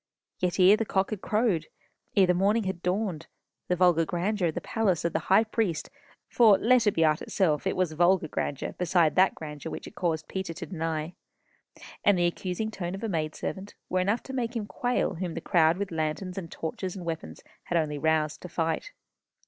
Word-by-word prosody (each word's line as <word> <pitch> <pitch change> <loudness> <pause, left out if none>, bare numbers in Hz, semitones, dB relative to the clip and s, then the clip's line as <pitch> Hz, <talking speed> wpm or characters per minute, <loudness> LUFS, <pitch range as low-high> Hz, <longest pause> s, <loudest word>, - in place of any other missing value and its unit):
Yet 180 +1 -1
ere 185 +3 +8
the 225 - 0
cock 195 -2 0
had 210 -3 -4
crowed, 210 -7 +1 0.5
ere 195 - +6
the 180 - +3
morning 205 +5 +2
had 190 -3 -4
dawned, 180 -3 -2 0.4
the 180 - +1
vulgar 175 -2 +4
grandeur 180 +3 0
of 160 - -3
the - - -1
palace 195 -8 0
of 170 - 0
the - - +1
high 195 +4 +6
priest 215 -8 -2 0.4
(for 220 -5 +5
let 240 -1 +3
it 205 - +3
be 165 - +4
art 155 0 +2
itself, 155 -7 0
it - - 0
was 185 -3 +1
vulgar 175 +1 +3
grandeur 145 -2 -3
beside 175 -2 +2
that 190 +1 +4
grandeur 150 0 -7
which - - -6
it - - -10
caused 160 -5 -2
Peter 190 -3 -4
to - - -6
deny), 165 -2 -3 0.9
and 205 -2 +4
the 175 - +2
accusing 185 +5 -2
tone 185 -3 -4
of 195 - -8
a 225 - -1
maid 155 -4 -2
servant, 195 +1 -5
were 185 - +1
enough 200 +6 0
to 265 - -8
make 245 -2 -2
him 220 -3 -2
quail 245 0 -1
whom 175 -2 -4
the - - -2
crowd 165 -2 +3
with 200 -1 -3
lanterns, 160 +3 -2
and 170 -4 -6
torches, 180 +3 -4
and 180 -3 -7
weapons, 165 -1 -5 0.2
had 175 - 0
only 150 -3 -1
roused 155 0 +1
to 180 - -8
fight. 165 - -2
180 Hz, 210 wpm, -28 LUFS, 165-200 Hz, 0.9 s, ere